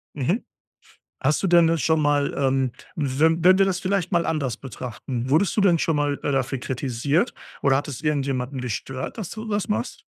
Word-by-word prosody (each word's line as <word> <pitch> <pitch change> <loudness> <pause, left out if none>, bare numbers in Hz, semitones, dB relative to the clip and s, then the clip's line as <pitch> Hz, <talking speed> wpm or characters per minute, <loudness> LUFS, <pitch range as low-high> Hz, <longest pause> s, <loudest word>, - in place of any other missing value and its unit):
Mhm. 155 - 0 0.8
Hast 150 - +2
du - - +2
denn, 170 -2 +5
äh, 165 0 +1
schon 160 +3 +2
mal 145 -1 +1
ähm, 135 -2 +1 0.2
we 140 -3 -2 0.2
wenn 185 +1 +7
wir 195 - +6
das 190 -2 0
vielleicht 185 -2 -1
mal 170 -1 +2
anders 140 -7 -1
betrachten, 125 0 -6
wurdest 165 +6 +2
du - - +4
denn 185 -4 +4
schon 160 - +1
mal, 145 -1 0
äh, 145 - 0
dafür 135 0 0
kritisiert 135 - -1 0.3
oder 135 -1 +4
hat 140 - -2
es 140 -1 -6
irgendjemanden 135 -3 -1
gestört, 130 - -5
dass 195 -5 -5
du 220 0 -6
das 205 -2 -1
machst? 110 +3 -3
145 Hz, 195 wpm, -24 LUFS, 130-170 Hz, 0.8 s, wenn